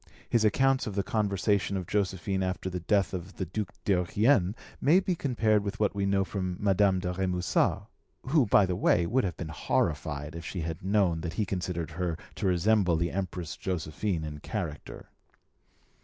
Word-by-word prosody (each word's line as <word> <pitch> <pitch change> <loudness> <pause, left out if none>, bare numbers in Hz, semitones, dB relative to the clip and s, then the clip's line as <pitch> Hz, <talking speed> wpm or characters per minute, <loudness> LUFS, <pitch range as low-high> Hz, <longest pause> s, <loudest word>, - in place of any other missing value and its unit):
His 115 -2 +2
account 130 +5 +3
of 105 - -4
the 100 - +1
conversation 100 -1 0
of 90 - -4
Josephine 95 -1 -1
after 95 0 -2
the 90 - -3
death 100 +2 +1
of 90 +1 -6
the 95 - -2
Duc 95 +3 -4
d'Eughien 100 +2 +2 0.3
may 165 +6 +5
be 185 -1 -1
compared 115 -9 +1
with 105 +2 -4
what 105 -2 +2
we 100 -1 -1
know 100 0 +2
from 95 -3 -3
Madame 100 -1 +3
de 90 0 -2
Remusat, 90 -1 +1 0.4
who, 135 -2 +3
by 100 - +5
the 90 -1 -1
way, 85 -1 +3
would 130 +8 +1
have 90 -3 -3
been 85 - -5
horrified 75 -1 -1
if 85 - -6
she 90 +1 -4
had 80 0 -4
known 95 -4 +2
that 85 0 -4
he 105 +3 0
considered 90 -3 -3
her 85 0 -2 0.2
to - - -2
resemble 90 0 +3
the 85 +1 0
Empress 90 -4 -4
Josephine 85 0 -2
in 75 -1 -6
character. 75 0 -6
95 Hz, 180 wpm, -29 LUFS, 85-105 Hz, 0.4 s, may